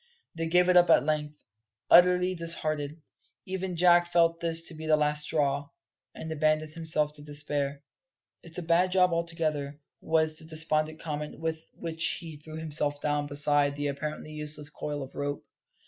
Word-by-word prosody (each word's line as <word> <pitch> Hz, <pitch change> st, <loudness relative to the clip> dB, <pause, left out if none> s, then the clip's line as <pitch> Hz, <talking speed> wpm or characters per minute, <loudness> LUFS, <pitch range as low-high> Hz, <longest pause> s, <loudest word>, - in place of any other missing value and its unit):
They 165 Hz, 0 st, -3 dB
gave 180 Hz, +2 st, +4 dB
it 180 Hz, -, +4 dB
up 175 Hz, -1 st, +6 dB
at 140 Hz, -5 st, +5 dB
length, 150 Hz, -1 st, -2 dB, 0.4 s
utterly 180 Hz, +1 st, +6 dB
disheartened. 155 Hz, -3 st, -3 dB, 0.4 s
Even 190 Hz, -1 st, -4 dB
Jack 175 Hz, 0 st, +4 dB
felt 165 Hz, -1 st, +3 dB
this 165 Hz, -1 st, +1 dB
to 170 Hz, -, -5 dB
be 160 Hz, 0 st, -7 dB
the 155 Hz, -1 st, +4 dB
last 150 Hz, 0 st, +1 dB
straw, 145 Hz, -2 st, 0 dB, 0.5 s
and 160 Hz, -, -7 dB
abandoned 155 Hz, 0 st, +1 dB
himself 155 Hz, -2 st, 0 dB
to 150 Hz, -, -6 dB
despair. 145 Hz, -1 st, -3 dB, 0.6 s
"It's 165 Hz, -1 st, -12 dB
a 180 Hz, -, -4 dB
bad 170 Hz, +3 st, +2 dB
job 180 Hz, -1 st, +4 dB
altogether," 155 Hz, -4 st, -2 dB, 0.2 s
was 160 Hz, -1 st, +1 dB
the 160 Hz, -, -6 dB
despondent 155 Hz, 0 st, -1 dB
comment 150 Hz, -1 st, -5 dB
with 160 Hz, 0 st, -3 dB
which 165 Hz, 0 st, +1 dB
he 165 Hz, -3 st, -8 dB
threw 155 Hz, +1 st, -10 dB
himself 150 Hz, -2 st, -2 dB
down 145 Hz, 0 st, -1 dB
beside 145 Hz, 0 st, +1 dB
the 145 Hz, 0 st, -2 dB
apparently 150 Hz, +2 st, -5 dB
useless 150 Hz, -1 st, -2 dB
coil 145 Hz, -1 st, -4 dB
of 130 Hz, -, -11 dB
rope. 145 Hz, 0 st, -4 dB
155 Hz, 165 wpm, -28 LUFS, 150-165 Hz, 0.6 s, up